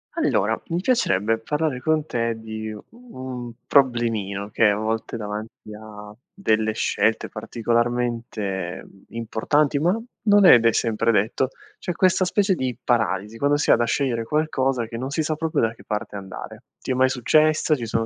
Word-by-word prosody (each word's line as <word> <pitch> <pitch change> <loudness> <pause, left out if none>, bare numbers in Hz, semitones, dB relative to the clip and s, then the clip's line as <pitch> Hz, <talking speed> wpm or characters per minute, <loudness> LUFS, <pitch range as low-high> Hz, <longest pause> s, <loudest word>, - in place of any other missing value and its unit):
Allora, 110 +3 +1
mi 170 +1 -1
piacerebbe 115 - +1
parlare 150 +2 -1
con 155 0 +1
te 115 -5 -1
di 110 0 -6 0.2
un 130 - -8
problemino, 115 -7 +1
che 110 - +4
è - - +5
a 100 - +2
volte 110 +2 -3
davanti 105 0 -7
a 105 -1 -11 0.2
delle 110 - 0
scelte, 110 0 0
particolarmente, 115 -5 -2
uhm, 95 - -19
importanti, 140 +6 0
ma 180 +8 +1 0.3
non 205 -2 +6
è 120 - +9
de 115 0 +3
sempre 115 0 +1
detto, 110 +5 +1 0.3
c'è 180 - -3
questa 185 +1 +3
specie 190 +2 +2
di 130 -7 -3
paralisi, 110 -2 0
quando 145 +1 +2
si 145 - +2
ha - - +8
da 120 - +1
scegliere 120 -3 0
qualcosa 135 -3 0
che 115 +1 -7
non 130 +2 -4
si 155 +3 -1
sa 155 - -1
proprio 160 -3 -1
da 115 0 +1
che - - -17
parte 105 -1 -4
andare. 95 -1 -8 0.2
Ti - - -4
è - - +3
mai 130 +1 +3
successa? 155 +5 +3
Ci 120 -5 -5
sono 115 +1 0
120 Hz, 175 wpm, -23 LUFS, 110-145 Hz, 0.3 s, è